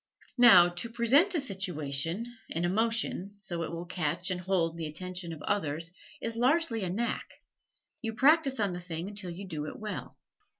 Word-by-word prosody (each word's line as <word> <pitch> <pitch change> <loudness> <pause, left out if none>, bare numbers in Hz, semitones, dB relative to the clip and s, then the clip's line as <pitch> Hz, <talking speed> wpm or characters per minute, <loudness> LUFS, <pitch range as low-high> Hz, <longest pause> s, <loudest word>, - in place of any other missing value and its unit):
Now, 185 -8 +9
to 175 +7 -4
present 265 - +3
a - - +3
situation, 175 - 0 0.2
an 165 +2 -1
emotion, 205 0 0
so 175 -5 -3
it 165 - -3
will 170 +1 -5
catch 175 +1 -1
and 180 -1 -2
hold 175 -3 0
the 165 -2 -4
attention 180 +2 -6
of 155 -2 -8
others, 165 -4 -1 0.3
is 230 0 -3
largely 250 - +2
a 180 - -1
knack 235 +7 -2 0.7
you 225 -2 -3
practise 275 0 +4
on 200 -3 +1
the 175 - -5
thing 170 0 -5
until 205 -3 -7
you 180 +4 -7
do 155 -4 -4
it - - -7
well. 215 -1 -6
185 Hz, 175 wpm, -30 LUFS, 170-230 Hz, 0.7 s, Now